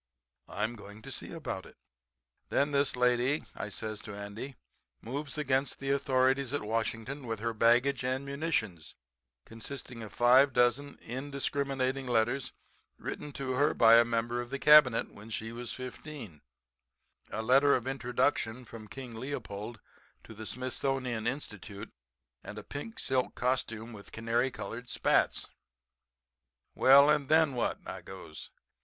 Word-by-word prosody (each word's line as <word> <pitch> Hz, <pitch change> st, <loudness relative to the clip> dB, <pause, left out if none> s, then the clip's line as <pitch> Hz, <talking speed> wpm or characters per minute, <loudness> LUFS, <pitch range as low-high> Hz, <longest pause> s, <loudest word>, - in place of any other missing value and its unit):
I'm 110 Hz, +3 st, -2 dB
going 105 Hz, 0 st, -12 dB
to -, -, -8 dB
see -, -, -6 dB
about -, -, -5 dB
it." -, -, -17 dB, 0.7 s
"'Then 145 Hz, +1 st, +2 dB
this 140 Hz, -1 st, +2 dB
lady,' 125 Hz, +3 st, +2 dB
I 105 Hz, -, -5 dB
says 110 Hz, +1 st, -5 dB
to 105 Hz, -, -8 dB
Andy, 100 Hz, +7 st, -7 dB, 0.4 s
'moves 140 Hz, +4 st, -5 dB
against 140 Hz, -2 st, +1 dB
the 135 Hz, 0 st, -1 dB
authorities 135 Hz, -1 st, +2 dB
at 145 Hz, -, -2 dB
Washington 115 Hz, +5 st, -2 dB
with 115 Hz, -2 st, -3 dB
her 115 Hz, +1 st, -1 dB
baggage 120 Hz, +5 st, +3 dB
and 130 Hz, +2 st, -1 dB
munitions, 140 Hz, -, -2 dB, 0.5 s
consisting 120 Hz, +1 st, -7 dB
of 110 Hz, -, -8 dB
five 130 Hz, +3 st, +5 dB
dozen 125 Hz, +4 st, +2 dB
indiscriminating 135 Hz, 0 st, -2 dB
letters 120 Hz, +2 st, +1 dB, 0.5 s
written 150 Hz, -, -6 dB
to 135 Hz, -1 st, -3 dB
her 145 Hz, +4 st, +2 dB
by 115 Hz, 0 st, +8 dB
a -, -, +7 dB
member 120 Hz, +1 st, -1 dB
of 120 Hz, -, -8 dB
the 140 Hz, -, -2 dB
Cabinet 150 Hz, -5 st, +6 dB
when 105 Hz, +2 st, -12 dB
she 115 Hz, 0 st, -4 dB
was 120 Hz, +1 st, -6 dB
15; 130 Hz, -, -8 dB, 0.9 s
a 110 Hz, +2 st, -3 dB
letter 135 Hz, +4 st, +5 dB
of 125 Hz, -, -2 dB
introduction 125 Hz, -2 st, 0 dB
from 110 Hz, -1 st, -10 dB
King 125 Hz, +2 st, -8 dB
Leopold 115 Hz, -3 st, -5 dB, 0.4 s
to -, -, -11 dB
the 110 Hz, 0 st, -7 dB
Smithsonian 130 Hz, -2 st, -2 dB
Institution, 105 Hz, -5 st, -5 dB, 0.5 s
and 105 Hz, -, -8 dB
a 105 Hz, -, -6 dB
pink 145 Hz, -, -7 dB
silk 130 Hz, -1 st, 0 dB
costume 120 Hz, -2 st, -1 dB
with 100 Hz, -2 st, -11 dB
canary 115 Hz, +3 st, 0 dB
colored 115 Hz, +2 st, -7 dB
spats. -, -, +2 dB, 1.3 s
"'Well 140 Hz, +2 st, +7 dB
and 150 Hz, -2 st, +2 dB
then 155 Hz, -2 st, +5 dB
what?' 120 Hz, -, 0 dB
I -, -, -6 dB
goes. -, -, -9 dB
125 Hz, 145 wpm, -31 LUFS, 115-140 Hz, 1.3 s, by